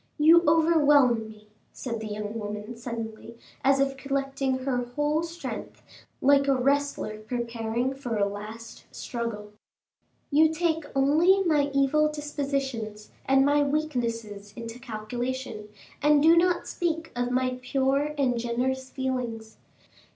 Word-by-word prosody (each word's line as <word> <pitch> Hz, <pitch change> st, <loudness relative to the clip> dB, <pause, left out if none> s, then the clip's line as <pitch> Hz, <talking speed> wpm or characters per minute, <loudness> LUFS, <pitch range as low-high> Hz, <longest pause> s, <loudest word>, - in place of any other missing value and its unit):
"You 330 Hz, +3 st, +6 dB
overwhelm 295 Hz, -8 st, +4 dB
me," 215 Hz, -1 st, -15 dB, 0.3 s
said 235 Hz, -3 st, -5 dB
the 220 Hz, -, -5 dB
young 210 Hz, 0 st, -4 dB
woman 210 Hz, +2 st, -6 dB
suddenly, 230 Hz, -1 st, -7 dB, 0.3 s
as 275 Hz, 0 st, +4 dB
if 275 Hz, 0 st, +1 dB
collecting 275 Hz, -1 st, -1 dB
her 265 Hz, -2 st, 0 dB
whole 295 Hz, +5 st, 0 dB
strength, 335 Hz, +1 st, -7 dB, 0.4 s
like 280 Hz, +1 st, +4 dB
a 275 Hz, -, +4 dB
wrestler 275 Hz, -4 st, 0 dB
preparing 235 Hz, +2 st, -2 dB
for 245 Hz, -5 st, -4 dB
a 200 Hz, -, +3 dB
last 210 Hz, +3 st, -8 dB
struggle; 225 Hz, -4 st, -5 dB, 0.8 s
"you 310 Hz, +2 st, +5 dB
take 320 Hz, -1 st, 0 dB
only 320 Hz, +8 st, +4 dB
my 300 Hz, -5 st, +2 dB
evil 275 Hz, +2 st, +3 dB
dispositions 275 Hz, -8 st, -4 dB, 0.2 s
and 270 Hz, 0 st, +5 dB
my 290 Hz, +1 st, +3 dB
weaknesses 230 Hz, -9 st, -2 dB
into 230 Hz, 0 st, -7 dB
calculation, 240 Hz, -1 st, -5 dB, 0.3 s
and 295 Hz, -1 st, +4 dB
do 325 Hz, +1 st, +7 dB
not 350 Hz, +1 st, +2 dB
speak 325 Hz, -2 st, -2 dB
of 245 Hz, 0 st, -1 dB
my 255 Hz, 0 st, 0 dB
pure 275 Hz, +3 st, 0 dB
and 250 Hz, -4 st, +1 dB
generous 255 Hz, +3 st, -2 dB
feelings. 245 Hz, -5 st, -4 dB
260 Hz, 130 wpm, -27 LUFS, 230-290 Hz, 0.8 s, do